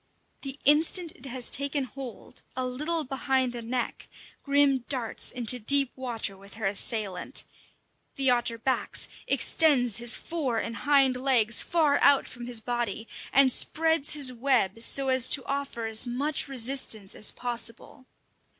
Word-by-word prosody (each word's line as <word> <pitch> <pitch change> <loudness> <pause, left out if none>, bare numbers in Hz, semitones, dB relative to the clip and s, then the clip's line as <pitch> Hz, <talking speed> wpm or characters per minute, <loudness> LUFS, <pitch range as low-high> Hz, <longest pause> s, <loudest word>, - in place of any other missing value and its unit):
The 275 0 -7
instant 315 +4 +3
it 260 - -12
has 255 -1 -1
taken 280 0 -1
hold 255 -1 -10
a 255 0 -2
little 305 +6 -3
behind 265 -2 -1
the 240 - -6
neck 240 +2 -4 0.3
Grim 280 -1 +2
darts 250 -5 0
into 245 0 +3
deep 275 +3 +4
water 235 -6 -5
with 200 +1 -15
her 220 -2 -5
assailant. 200 -1 -1 0.7
The 270 -2 +3
otter 240 -1 0
backs, 255 +3 -2 0.2
extends 255 -9 +2
his 235 0 +3
fore 285 -9 -3
and 230 +1 -4
hind 270 -2 +2
legs 250 -4 +2
far 310 -4 +1
out 280 -1 +4
from 240 -1 -9
his 240 -2 +3
body, 235 -2 -3 0.2
and 270 -1 +5
spreads 320 +1 +1
his 280 -4 +2
web, 235 -5 0
so 270 +3 +1
as 260 -1 +3
to 265 -4 +2
offer 275 -4 -4
as 225 +2 +1
much 280 +6 0
resistance 245 -6 0
as 215 - -2
possible. 240 +1 -4
255 Hz, 150 wpm, -27 LUFS, 235-280 Hz, 0.7 s, and